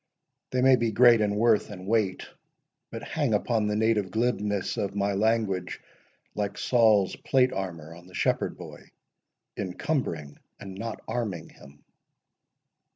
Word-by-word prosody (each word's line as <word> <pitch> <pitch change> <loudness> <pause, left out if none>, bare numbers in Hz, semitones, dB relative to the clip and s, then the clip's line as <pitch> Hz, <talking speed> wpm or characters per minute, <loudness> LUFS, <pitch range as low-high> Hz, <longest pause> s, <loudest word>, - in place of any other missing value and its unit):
They 125 0 0
may 130 -1 +6
be 115 -1 0
great 120 +1 +6
in 105 -1 +1
worth 110 0 +3
and 95 -3 -9
weight, 105 -3 0 0.6
but - - -7
hang - - 0
Upon 110 -3 0
the 105 - -1
native 110 -3 +1
glibness 105 -2 -1
of 100 -1 -3
my 100 0 0
language 100 -3 0 0.5
Like 100 -1 -3
Saul's 110 -6 +3
plate 130 -1 +2
armour 85 -5 -5
on 85 +1 -14
the 90 - -13
shepherd - - 0
boy, - - -11 0.7
Encumbering 90 - -3 0.2
and 95 -1 -8
not 110 +3 -6
arming 100 -9 -3
him. 70 +1 -17
105 Hz, 140 wpm, -27 LUFS, 95-115 Hz, 0.7 s, may